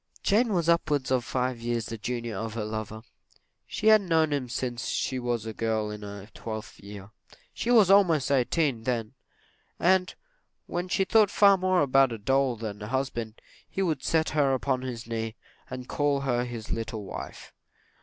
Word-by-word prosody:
Jane 225 +3 +3
was 170 -4 0
upwards 150 -5 +1
of 130 -2 +2
five 125 -1 -2
years 120 -1 -1
the 115 - -6
junior 120 0 -3
of 110 +2 -4
her 110 -2 -2
lover. 110 0 -5 0.6
She - - -5
had 215 -1 +7
known 160 -5 +2
him 130 -4 -2
since 120 0 -3
she 130 - -1
was 120 -3 -2
a 110 - -5
girl 110 -1 -1
in 105 0 -7
her 100 -1 -8
twelfth 110 -1 -7
year. 100 0 -10 0.4
He 235 - -3
was 220 -6 +6
almost 170 -9 +4
eighteen 135 -2 +1
then; 115 -4 -2 0.7
and, 185 +1 +2 0.5
when 175 +1 -3
she 190 +1 +1
thought 215 0 +4
far 200 0 +6
more 185 -3 +2
about 135 -1 +4
a 115 - -4
doll 135 +3 +1
than 110 -2 -6
a 105 - -5
husband, 120 -3 -3 0.3
he 195 - -1
would 155 -7 -1
set 160 -1 +1
her 140 -3 +2
upon 130 0 -1
his 125 -3 -5
knee, 115 -1 -4 0.3
and 125 0 -7
call 145 -1 0
her 125 -2 0
his 115 -3 -7
little 110 -1 -4
wife. - - -8
125 Hz, 180 wpm, -27 LUFS, 115-160 Hz, 0.7 s, had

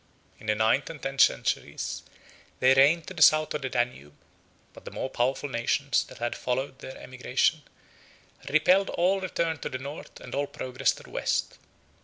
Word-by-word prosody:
In 110 - -12
the 105 - +2
ninth 110 +6 +2
and 165 -2 -8
tenth 135 0 0
centuries, - - +1 0.6
they 130 +1 +6
reigned 145 +5 +5
to - - -8
the 170 - -6
south 155 0 +6
of 150 - -3
the 130 - -3
Danube; 120 - -2 0.6
but - - -14
the - - -7
more 130 - -4
powerful 130 +4 0
nations 135 +2 0
that - - -13
had 120 0 -2
followed 130 +2 -3
their 130 - -9
emigration 130 +4 0 0.9
repelled 180 +6 +4
all 190 +3 +1
return 165 -4 -1
to - - -4
the 130 - -4
north 140 +4 -9
and 125 - -10
all 145 0 0
progress 130 -1 -1
to - - -13
the - - -15
west. - - -1
135 Hz, 180 wpm, -27 LUFS, 125-155 Hz, 0.9 s, they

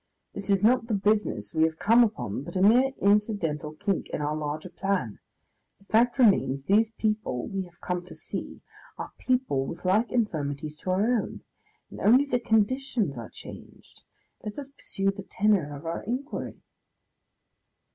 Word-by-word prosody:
This 200 0 -6
is 195 0 +3
not 240 +1 +4
the 220 - 0
business 200 - 0
we 160 - +1
have 160 0 -2
come 230 +6 +5
upon, 205 - -2
but 145 - -9
a 185 - +1
mere 250 +6 +5
incidental 200 -7 +1
kink 195 +4 -2
in - - -3
our 150 +1 -1
larger 155 +3 -4
plan. 190 - -2 0.6
The 200 - -25
fact 235 +4 +3
remains, 190 - +3
these 215 +7 +3
people 215 - -2
we 195 -1 -3
have 175 0 -19
come 180 0 -2
to - - -10
see - - -6 0.4
are - - -6
people 250 - 0
with 170 - -8
like 210 +6 +2
infirmities 155 - -2
to 185 - -6
our 185 +2 +2
own 235 -1 0 0.5
and - - -9
only 250 +7 +5
the 245 -3 0
conditions 225 - +1
are 115 -3 -7
changed. - - -13 0.4
Let 210 - -6
us 280 -2 -6
pursue 195 -7 -1
the 200 0 -8
tenour 190 -7 +1
of 150 - -12
our 165 +1 -3
inquiry." 255 +7 -5
200 Hz, 165 wpm, -27 LUFS, 155-225 Hz, 0.6 s, come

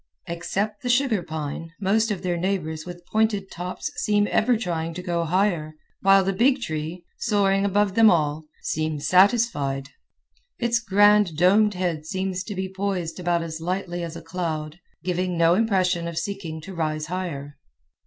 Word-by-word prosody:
Except 195 +5 -3
the 250 - -3
sugar 245 -5 +2
pine, 160 0 -5
most 215 +3 +2
of 195 -3 -3
their 180 -1 0
neighbors 170 -3 -2
with 175 -1 -9
pointed 215 -3 +1
tops 180 +2 -5
seem 205 -1 +2
ever 245 +1 +3
trying 165 -6 -3
to 180 - -6
go 170 -2 -1
higher, 170 -3 0 0.3
while 195 0 +6
the 195 +1 0
big 255 +7 +3
tree, 160 -2 -4
soaring 200 -3 +2
above 200 0 +2
them 225 +1 +7
all, 155 -2 +1 0.2
seems 155 -1 -2
satisfied. 180 - +3 0.7
Its 235 -1 +1
grand 205 -5 +4
domed 200 +4 +4
head 170 -4 -2
seems 190 0 -2
to 205 - -5
be 190 0 -2
poised 190 -3 -3
about 175 -1 0
as 160 -1 -6
lightly 175 0 -3
as 165 -1 -5
a 165 - -8
cloud, 165 -2 -4 0.2
giving 180 0 -1
no 165 0 +5
impression 185 -5 +1
of 170 -1 -6
seeking 175 -6 -4
to 190 +5 -9
rise 155 -2 -2
higher. 155 -5 -5
180 Hz, 165 wpm, -24 LUFS, 165-200 Hz, 0.7 s, them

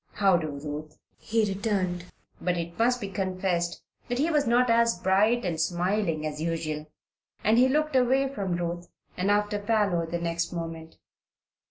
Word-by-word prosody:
"How 195 -3 +4
do, 165 -2 0
Ruth," 150 +1 -6 0.2
he 225 0 +1
returned; 195 -3 -1 0.4
but 180 -1 0
it 170 +2 -5
must 245 +2 +3
be 205 - -4
confessed 185 -2 -2 0.3
that 245 - -1
he 310 +5 +1
was 295 -4 +2
not 245 +2 +4
as 230 -2 +3
bright 205 +6 +2
and 165 -3 -1
smiling 175 -1 0
as 155 0 -4
usual, 155 -2 -2 0.6
and 220 +3 +4
he 255 +1 +5
looked 305 +1 +1
away 260 +2 +3
from 200 -9 -2
Ruth 175 0 -3 0.3
and 185 +2 0
after 205 0 +1
Parloe 205 -6 +1
the 170 +1 -2
next 170 0 -2
moment. 165 -1 -6
185 Hz, 165 wpm, -27 LUFS, 170-225 Hz, 0.6 s, he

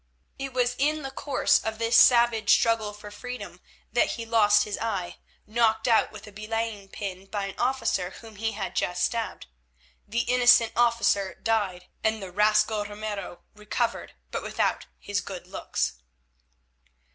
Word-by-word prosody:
It 270 0 -4
was 245 -1 +1
in 305 +2 +1
the 270 - -5
course 280 +1 +2
of 220 0 -3
this 230 +1 +1
savage 235 -3 +5
struggle 225 -2 +3
for 210 0 -11
freedom 210 -4 -8 0.3
that 240 - +2
he 230 - -6
lost 210 -2 +4
his 210 - -4
eye, 200 -6 -3 0.3
knocked 220 0 +1
out 230 -2 +3
with 215 0 -11
a 210 - -12
belaying 215 -1 -4
pin 195 -2 -6
by 200 0 -3
an 195 - -8
officer 245 -8 0
whom 220 +2 -13
he 225 +1 -2
had 200 -2 -5
just 180 0 0
stabbed. 230 -1 -3 0.6
The 235 +3 0
innocent 245 -2 +5
officer 230 -5 +2
died 205 -5 -1 0.2
and 220 0 +1
the 190 -3 -8
rascal 215 +2 +3
Ramiro 205 -3 -6
recovered, 210 0 -3 0.2
but - - -3
without - - -1
his - - -2
good - - -8
looks. - - -3
220 Hz, 155 wpm, -26 LUFS, 205-230 Hz, 0.6 s, savage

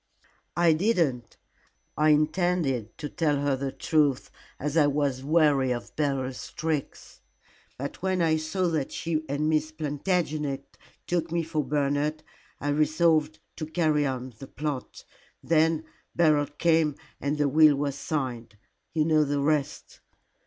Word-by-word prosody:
"I 170 -1 +5
didn't. 155 - 0 0.6
I 155 +1 +3
intended 150 - +1
to 150 - -4
tell 150 0 0
her 140 -1 +1
the 135 0 -3
truth, 145 -4 +1 0.3
as 150 +2 -3
I 155 -3 +5
was 140 -2 0
weary 145 -4 +3
of 120 -1 -5
Beryl's 135 -3 -2
tricks. 160 -3 -4 0.6
But 140 +6 -6
when 185 0 0
I 160 -2 +3
saw 155 +4 -1
that 155 -5 -2
she 160 -2 -2
and 145 +2 0
Miss 155 0 +1
Plantagenet 150 -2 -2 0.3
took 170 -2 -1
me 170 0 0
for 155 -2 -2
Bernard, 145 +2 -1 0.4
I 145 - -2
resolved 155 +1 +2 0.2
to 155 - -4
carry 155 -2 +1
on 130 -1 -4
the 135 - -9
plot. 145 -3 -5 0.4
Then 160 0 +2 0.3
Beryl 155 -4 +3
came 160 0 +2 0.2
and 145 +2 -1
the 145 -1 +2
will 155 +1 +6
was 140 0 -1
signed. 130 -7 -4 0.4
You 155 -1 +2
know 155 -1 +4
the 145 0 -1
rest." 145 -1 -1
150 Hz, 140 wpm, -27 LUFS, 140-160 Hz, 0.6 s, will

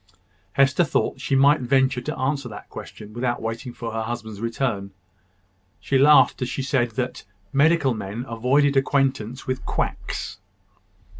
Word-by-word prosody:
Hester 140 +5 +4
thought 135 -3 -1
she 135 - 0
might 140 +3 +5
venture 130 0 +2
to - - -4
answer 135 0 -1
that 105 - -10
question 105 0 -10
without 120 +1 -1
waiting 115 +3 -4
for 115 -1 -6
her 115 - -2
husband's 110 -2 -5
return. 115 -4 -2 0.9
She 135 - +1
laughed 145 0 +6
as 125 - -1
she 135 - -3
said, 130 -3 +1
that 125 +2 -3 0.3
medical 145 -1 +4
men 110 +3 -5
avoided 135 +5 +2
acquaintance 135 -3 0
with 130 0 -3
quacks. - - -3
130 Hz, 145 wpm, -23 LUFS, 115-135 Hz, 0.9 s, laughed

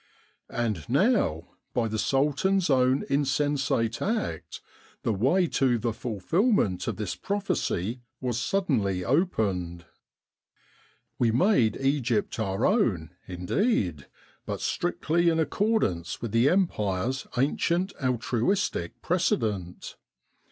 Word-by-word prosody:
'* - - -46
And 110 -8 -2
now, 140 - +2 0.3
by 120 -2 +1
the 110 0 -3
Sultan's 150 - +1
own 130 0 +3
insensate 135 -4 0
act, 210 - -2 0.4
the 115 - +1
way 135 - +2
to 130 -3 +2
the 115 0 -2
fulfilment 115 - 0
of - - -1
this 105 -5 -3
prophecy 125 - -2 0.2
was 120 -3 -2
suddenly 115 - 0
opened. 100 - 0 1.3
We 120 - +3
made 125 - +3
Egypt 130 -6 0
our 100 0 0
own, 100 - +1 0.2
indeed, 90 - -1 0.4
but - - -3
strictly 170 -1 0
in 165 - +1
accordance 160 - 0
with 115 -3 -5
the 115 +5 +4
Empire's 130 - 0
ancient 170 +8 +1
altruistic 125 - -1
precedent. 110 - -1
125 Hz, 105 wpm, -27 LUFS, 105-170 Hz, 1.3 s, the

